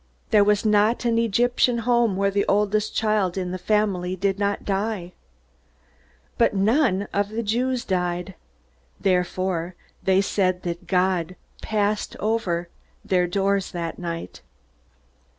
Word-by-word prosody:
There 210 -2 +6
was 210 +1 +2
not 215 +3 +3
an 230 -1 +2
Egyptian 240 +2 +2
home 235 -4 +3
where 200 +1 +1
the 200 0 0
oldest 210 +1 +1
child 210 -4 +1
in 180 -1 -2
the 185 - -4
family 185 -2 0
did 195 +1 -1
not 200 0 -1
die. 195 -2 -2 1.3
But 230 - +3
none 205 -1 +2
of 200 0 0
the 225 +2 -3
Jews 245 +4 -1
died. 180 0 -2 0.7
Therefore, 180 -2 0 0.3
they 190 0 +3
said 185 -2 0
that 170 -1 -5
God 185 -2 +1 0.3
passed 210 -1 -1
over 200 -6 -1 0.4
their 180 -2 +2
doors 195 +1 0
that 170 -2 -4
night. 170 -1 -6
200 Hz, 130 wpm, -24 LUFS, 180-215 Hz, 1.3 s, There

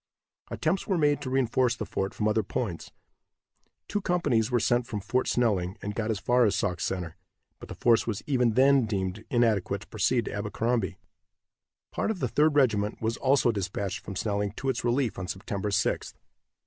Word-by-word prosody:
Attempts 170 +5 -1
were 190 - +1
made 145 -2 +2
to 130 - -4
reinforce 130 -1 +2
the - - -4
fort 95 0 -3
from 105 - 0
other 110 +1 +2
points. 100 -3 -4 1.0
Two 205 - -2
companies 145 - +1
were 125 -1 +2
sent 120 +2 +1
from 105 - -3
Fort 115 +6 -1
Snelling, 100 -5 +1
and 105 +1 -5
got 110 +1 -2
as 110 - 0
far 125 +5 +3
as 105 -4 +3
Sauk 90 -2 -1
Center, 90 -2 -3 0.4
but - - -11
the - - -6
force 115 -1 +3
was 105 -4 -3
even 125 -5 +2
then 135 -2 +5
deemed 95 0 -3
inadequate 110 -5 +1
to - - -13
proceed 115 +3 +1
to - - -5
Abercrombie. 105 0 -1 0.9
Part - - -1
of 220 - -1
the - - -1
Third 150 0 +2
Regiment 105 -7 +2
was 115 +1 -1
also 135 -2 +3
dispatched 100 -1 -3
from 100 - -8
Snelling 100 0 -1
to 135 - -3
its 130 - -1
relief 120 -1 0
on 90 - -4
September 95 +2 -3
6th. 100 - -1
115 Hz, 185 wpm, -28 LUFS, 100-130 Hz, 1.0 s, then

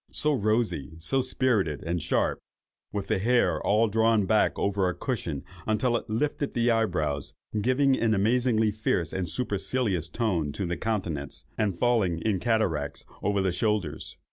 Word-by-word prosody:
—so 150 0 +2
rosy, 110 - 0
so 130 +12 +1
spirited, 115 - +1
and 85 +1 -2
sharp!—with 100 +6 -3
the 110 -3 0
hair 105 -7 +2
all 110 +3 +3
drawn 110 -1 +3
back 110 +3 +2
over 100 -2 +1
a 90 - -3
cushion, 90 - -3 0.2
until 120 +3 +1
it 115 - -3
lifted 145 +5 -1
the 120 0 +3
eyebrows, 75 -11 -1 0.3
giving 130 +3 +3
an 115 -3 +1
amazingly 110 +1 +2
fierce 100 -5 -1
and 90 -3 -1
supercilious 100 -2 0
tone 90 -11 -1
to 95 +6 -3
the 90 0 -2
countenance, 90 -11 -2
and 100 -5 -1
falling 110 -8 +2
in 105 -4 +1
cataracts 85 -11 0 0.2
upon 100 -1 +1
the 95 - +1
shoulders. 95 -6 -2
105 Hz, 150 wpm, -27 LUFS, 90-115 Hz, 0.3 s, all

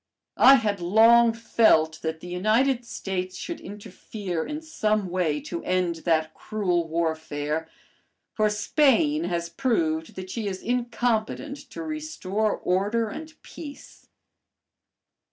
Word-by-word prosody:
I 270 +2 +9
had 210 -6 0
long 225 +6 +6
felt 160 -9 +2
that 160 0 -3
the - - -9
United 230 +8 +1
States 185 -4 -4
should 340 - -6
interfere 195 -3 -6
in 300 0 -5
some 215 - -1
way 170 -5 0
to 170 - -6
end 180 -2 0
that 160 -2 +1
cruel 180 -6 -1
warfare, 160 -1 -2 0.6
for 215 -1 +2
Spain 210 - +2
has 170 -1 -2
proved 170 -6 -1
that 185 0 -7
she 225 -3 -3
is 190 -1 -5
incompetent 240 +2 -1
to 335 - -7
restore 300 -10 -2
order 205 +5 0
and 315 +7 -9
peace. 290 -3 -11
200 Hz, 120 wpm, -25 LUFS, 170-235 Hz, 0.6 s, I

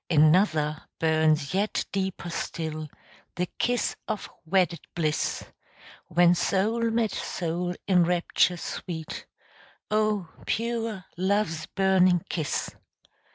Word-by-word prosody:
Another 155 -1 +4 0.2
burns 155 -2 +2
yet 200 +3 0
deeper 190 -3 -2
still, 155 -2 -4 0.5
The 180 - 0
kiss 245 0 +1
of 215 -3 -4
wedded 175 0 +2 0.2
bliss, 155 -3 0 0.6
When 175 +1 +5
soul 220 +6 +1
met 225 -2 +1
soul 175 +1 -2
in 180 -3 +5
rapture 175 0 +2
sweet 165 -1 -6 0.6
Oh, 215 -4 +1 0.2
pure 230 -3 -1
love's 185 -4 0
burning 185 -3 +3
kiss! 155 -4 -2
180 Hz, 100 wpm, -27 LUFS, 160-200 Hz, 0.6 s, When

